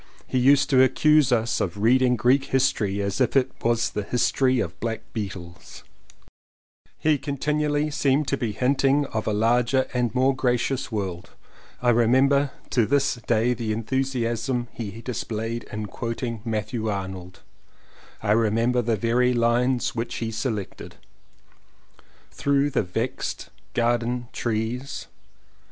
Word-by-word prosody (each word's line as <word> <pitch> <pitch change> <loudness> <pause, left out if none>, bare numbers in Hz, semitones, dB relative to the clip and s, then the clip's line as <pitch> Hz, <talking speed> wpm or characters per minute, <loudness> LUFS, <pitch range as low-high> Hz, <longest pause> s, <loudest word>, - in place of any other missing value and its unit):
He 130 - -1
used 135 +2 +5
to 130 -1 +6
accuse 150 +1 +4
us 115 -1 +1
of 90 +1 -2
reading 125 +4 +3
Greek 130 +4 +3
History 105 -7 0
as 100 +5 -2
if 130 - +1
it 130 -1 +3
was 115 0 +1
the 105 - -2
history 125 +4 +1
of - - -4
black 115 -1 -3
beetles. 95 -5 -7 1.1
He 155 -2 +2
continually 150 +2 -1
seemed 145 -1 +1
to - - +1
be 120 -5 -2
hinting 135 +4 +2
of 110 -1 -2
a - - +2
larger 120 +5 +2
and 125 -2 0
more 130 +1 +3
gracious 125 0 -1
world. 95 -5 -4 0.5
I 120 - +5
remember 130 +4 +3 0.2
to 120 -5 +2
this 140 -3 +1
day 120 +1 +2
the 115 -2 -3
enthusiasm 120 0 -1
he 110 -1 -6
displayed 115 -1 -4
in 105 0 -4
quoting 115 +2 -4
Matthew 110 0 -3
Arnold 95 -2 -5 0.4
— - - -25
I 105 - +1
remember 115 +3 +2
the 115 -1 0
very 120 +4 +2
lines 120 +2 +1
which 115 0 -4
he 115 -1 -3
selected: 110 -4 -4 1.4
"Through 140 0 +1
the - - +1
vex'd 90 -3 -4 0.3
garden 120 0 0
trees." 120 +4 -3
120 Hz, 135 wpm, -24 LUFS, 110-130 Hz, 1.4 s, to